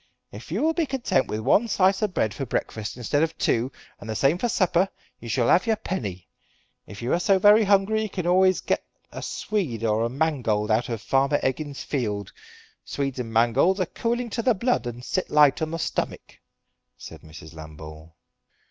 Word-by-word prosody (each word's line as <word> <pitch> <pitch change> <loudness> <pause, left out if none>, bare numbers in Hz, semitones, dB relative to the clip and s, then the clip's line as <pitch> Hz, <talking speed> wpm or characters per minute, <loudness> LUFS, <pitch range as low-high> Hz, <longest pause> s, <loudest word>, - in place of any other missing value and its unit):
If 110 +8 -11
you 205 - -1
will 320 +1 +3
be 325 -2 0
content 250 - 0
with 110 - -3
one 200 - +3
slice 190 -2 +2
of 210 -3 0
bread 110 -1 0
for 135 - -5
breakfast 110 -3 -4
instead 135 +4 0
of 165 0 -1
two, 120 +3 0 0.3
and 105 - -10
the 110 - -3
same 140 +9 +2
for 240 - 0
supper, 185 -2 +2 0.3
you 115 - -9
shall 120 0 +1
have 185 - +4
your 225 - +3
penny. 100 - -5 0.6
If 105 +3 -9
you 120 - 0
are 170 - +2
so 195 +2 +3
very 210 +3 +6
hungry 200 +2 +3
you 215 - -3
can 180 -3 -4
always 185 +1 +3
get - - -1 0.3
a - - -7
swede 160 - -3
or 110 -1 +1
a 115 - 0
mangold 125 -7 0
out 115 +3 +1
of 115 -3 -4
Farmer 135 +2 +2
Eggins's 140 +2 -2
field. 105 -8 -3 0.5
Swedes 135 -2 -3
and 115 -2 -4
mangolds 120 - +3
are 185 - +1
cooling 235 +4 -3
to 230 - -2
the 245 0 +2
blood 235 - 0
and 120 +1 -7
sit 185 - -2
light 150 -1 +4
on 160 - -1
the 165 - -3
stomick," 165 - -4 0.6
said - - -11
Mrs. 80 0 -12
Lambole. 80 0 -11
140 Hz, 200 wpm, -25 LUFS, -, 0.6 s, very